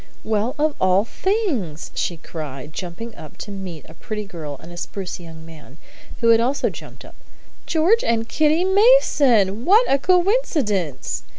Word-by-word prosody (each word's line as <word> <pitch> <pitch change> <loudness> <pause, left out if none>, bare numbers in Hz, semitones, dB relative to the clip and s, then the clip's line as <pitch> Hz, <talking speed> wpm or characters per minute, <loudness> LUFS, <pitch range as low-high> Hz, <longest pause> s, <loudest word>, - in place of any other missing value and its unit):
"Well, 220 +3 -1
of 305 0 +1
all 185 +2 +3
things!" 275 - -2
she 170 - -2
cried, 150 -3 -8
jumping 195 +7 -6
up 155 -7 -12
to 205 - -7
meet 185 -5 -7
a 160 - -13
pretty 210 +5 -5
girl 160 -8 -7
and 170 - -12
a 175 - -10
spruce 185 0 -5
young 160 -2 -11
man, 155 -3 -14 0.4
who 230 - +4
had 225 0 +6
also 270 +4 0
jumped - - -12
up. - - -14 0.5
"George 345 +8 +3
and 225 -1 0
Kitty 310 +6 +2
Mason! 285 - +4
What 420 - +5
a 275 - +3
coincidence!" 300 - 0
215 Hz, 160 wpm, -21 LUFS, -, 0.5 s, had